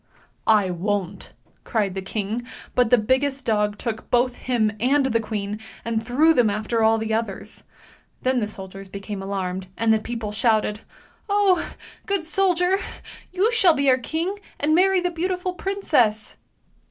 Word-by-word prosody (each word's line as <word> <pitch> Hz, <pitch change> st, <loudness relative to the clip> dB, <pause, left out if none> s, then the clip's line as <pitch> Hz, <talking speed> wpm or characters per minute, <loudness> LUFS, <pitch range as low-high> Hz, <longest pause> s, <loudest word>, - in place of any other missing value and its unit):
" -, -, -41 dB
I 190 Hz, -2 st, -2 dB
won't! 195 Hz, +1 st, -3 dB, 0.2 s
" -, -, -32 dB
cried 205 Hz, -4 st, -1 dB
the 190 Hz, -, -4 dB
king, 210 Hz, +4 st, -3 dB, 0.3 s
but 250 Hz, -2 st, +3 dB
the 245 Hz, -, +6 dB
biggest 265 Hz, +4 st, 0 dB
dog 210 Hz, -2 st, +1 dB
took 225 Hz, -1 st, -5 dB
both 245 Hz, +1 st, +2 dB
him 230 Hz, -4 st, 0 dB
and 270 Hz, +4 st, +3 dB
the 230 Hz, -3 st, +1 dB
queen 210 Hz, -2 st, -4 dB, 0.3 s
and 230 Hz, -1 st, 0 dB
threw 285 Hz, +8 st, +4 dB
them 245 Hz, -7 st, +3 dB
after 215 Hz, +3 st, -1 dB
all 220 Hz, 0 st, +4 dB
the 220 Hz, 0 st, -2 dB
others. 220 Hz, -3 st, -4 dB, 0.6 s
Then 255 Hz, 0 st, +2 dB
the 210 Hz, -, -1 dB
soldiers 195 Hz, -1 st, -9 dB
became 200 Hz, +1 st, -6 dB
alarmed, 190 Hz, -1 st, -3 dB
and 225 Hz, 0 st, +3 dB
the 220 Hz, -, +2 dB
people 225 Hz, -1 st, -5 dB
shouted, 215 Hz, -1 st, +1 dB, 0.5 s
"Oh! 400 Hz, -3 st, +3 dB, 0.4 s
good 395 Hz, -5 st, 0 dB
soldier, 360 Hz, +2 st, +2 dB, 0.5 s
you 390 Hz, +5 st, +2 dB
shall 390 Hz, -9 st, +5 dB
be 280 Hz, -2 st, +3 dB
our 255 Hz, -, +3 dB
king, 335 Hz, -, -3 dB, 0.2 s
and 300 Hz, +2 st, +2 dB
marry 375 Hz, +2 st, +4 dB
the 355 Hz, 0 st, -1 dB
beautiful 360 Hz, +2 st, -2 dB
princess! 310 Hz, -, 0 dB
230 Hz, 165 wpm, -23 LUFS, 210-320 Hz, 0.6 s, the